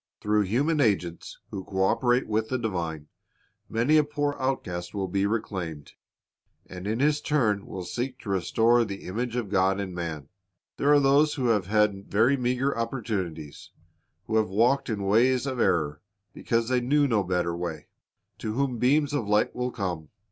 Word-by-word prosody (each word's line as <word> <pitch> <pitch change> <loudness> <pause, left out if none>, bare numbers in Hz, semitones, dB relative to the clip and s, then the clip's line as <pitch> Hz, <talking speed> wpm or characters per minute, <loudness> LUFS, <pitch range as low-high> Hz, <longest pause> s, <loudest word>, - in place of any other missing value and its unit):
Through 105 0 +1
human 145 - +1
agents 90 -8 -1
who 95 - -5
co 95 0 -1
operate 125 +5 +2
with 110 +1 -1
the 130 - 0
divine, 85 -9 -3 0.6
many 120 +8 +3
a 155 - +5
poor 145 0 -2
outcast 95 -10 -3
will 95 -2 -1
be 100 +2 0
reclaimed, 90 -9 -4 0.7
and 90 +1 -8
in 110 +3 -1
his 150 +1 +2
turn 110 -9 0
will 95 - -6
seek 125 +8 -4
to 105 - -8
restore 110 +6 +3
the 100 -3 -6
image 120 +5 -3
of 120 -5 -2
God 95 0 +2
in 95 -2 -4
man. 80 -5 -5 0.5
There 145 - +2
are 145 - +7
those 145 +2 +3
who 125 -4 0
have 105 -5 +1
had 105 -2 +1
very 115 +7 +3
meager 125 +1 0
opportunities, 105 - -4 0.6
who 110 - 0
have 110 -3 +1
walked 120 +8 +2
in 105 -3 -2
ways 120 +6 +3
of 130 -3 -3
error 75 -8 +1 0.3
because 115 0 -1
they 125 -1 +2
knew 145 +4 +2
no 110 -6 +2
better 90 -2 -1
way, 85 -3 -5 0.5
to 110 - -3
whom 130 -1 -1
beams 145 +4 +2
of 120 -8 -1
light 105 0 +2
will 125 0 -1
come. 90 -9 -4
110 Hz, 175 wpm, -26 LUFS, 95-125 Hz, 0.7 s, are